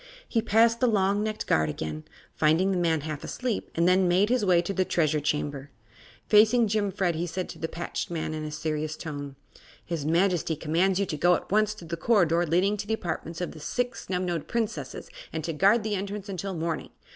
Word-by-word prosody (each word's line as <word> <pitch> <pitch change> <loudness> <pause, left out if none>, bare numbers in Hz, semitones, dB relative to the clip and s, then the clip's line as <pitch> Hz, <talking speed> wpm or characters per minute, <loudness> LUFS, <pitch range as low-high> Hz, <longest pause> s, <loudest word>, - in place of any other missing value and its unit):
He 230 - +1
passed 230 +1 +3
the 255 - +3
long 200 -2 +2
necked 215 0 -3
guard 80 0 +2
again, 75 0 -5 0.3
finding 165 +5 +3
the 190 - 0
man 165 -3 +1
half 150 -1 -5
asleep, 250 -4 -3
and 170 +1 +3
then 185 0 +4
made 185 +4 +3
his 250 -2 +2
way 180 -3 +4
to 195 - -3
the 190 - +2
Treasure 155 -4 +1
Chamber. 145 -1 -2 0.6
Facing 220 +2 +5
Jimfred 200 -4 0
he 165 +2 -2
said 185 +2 -3
to - - -9
the 160 - -2
patched 170 +1 -4
man, 160 -2 -3
in 155 0 -4
a 155 - -4
serious 155 0 -3
tone: 145 -3 -6 0.5
"His 170 -4 -3
Majesty 170 +1 +1
commands 170 +5 +1
you 200 - +2
to 155 - -4
go 175 +3 +4
at - - -6
once 215 +1 +2
to 180 - -11
the 170 +1 -4
corridor 175 -5 +3
leading 185 +6 +2
to 205 0 -5
the 220 - +1
apartments 165 -3 -5
of 180 - -2
the 155 - -11
Six 245 - -3
Snubnosed 180 -4 -2
Princesses 205 - -3 0.2
and 160 -1 -4
to 165 - -2
guard 200 +8 +4
the 215 -1 -2
entrance 200 +1 -4
until 195 0 -4
morning. 165 0 -3
175 Hz, 210 wpm, -27 LUFS, 160-205 Hz, 0.6 s, Facing